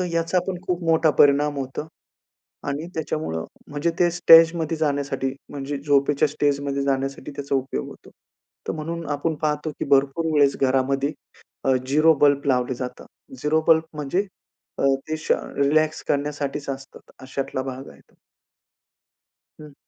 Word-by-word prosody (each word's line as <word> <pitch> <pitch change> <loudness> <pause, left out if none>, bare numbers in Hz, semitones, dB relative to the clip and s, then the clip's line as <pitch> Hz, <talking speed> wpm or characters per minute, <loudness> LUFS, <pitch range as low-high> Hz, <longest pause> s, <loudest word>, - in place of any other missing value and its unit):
तर - - 0
याचा 165 +2 +1
पण 180 -2 -3
खूप 180 -1 -1
मोठा 160 -1 +4
परिणाम 145 +1 +4
होतो 135 +3 -5 0.8
आणि 145 +4 -3
त्याच्यामुळं 155 - -3 0.2
म्हणजे 145 +3 -1
ते 175 -2 +4
स्टेजमध्ये 165 -1 +6
जाण्यासाठी 140 -3 -1 0.2
म्हणजे 140 0 -4
झोपेच्या 145 +1 +3
स्टेजमध्ये 140 -1 -1
जाण्यासाठी 135 +1 -2
त्याचा 140 0 -3
उपयोग 130 - -2
होतो. - - -14 0.6
तर - - 0
म्हणून 165 +1 -5
आपण 150 +3 -1
पाहतो 150 +1 -1
की - - 0
भरपूर 140 +4 +2
वेळेस 140 -2 +4
घरामध्ये 135 +2 +1 0.5
अ, 135 - +4
झिरो 155 +4 +5
बल्ब 140 -1 +4
लावले 125 -1 +1
जातात. 125 0 -7 0.4
झिरो 155 +2 +2
बल्ब 160 -1 +6
म्हणजे 150 +7 -1 0.5
अ, - - 0 0.2
ते 155 - -1
श 155 - 0
अ, - - 0 0.2
रिलॅक्स 155 +2 +2
करण्यासाठीच 145 0 -2
असतात. 135 0 -9
अशातला 130 0 -3
भाग 130 0 -7
आहे - - -17
तो. - - -29 1.5
हं. 150 -1 -12
145 Hz, 145 wpm, -23 LUFS, 135-155 Hz, 1.5 s, स्टेजमध्ये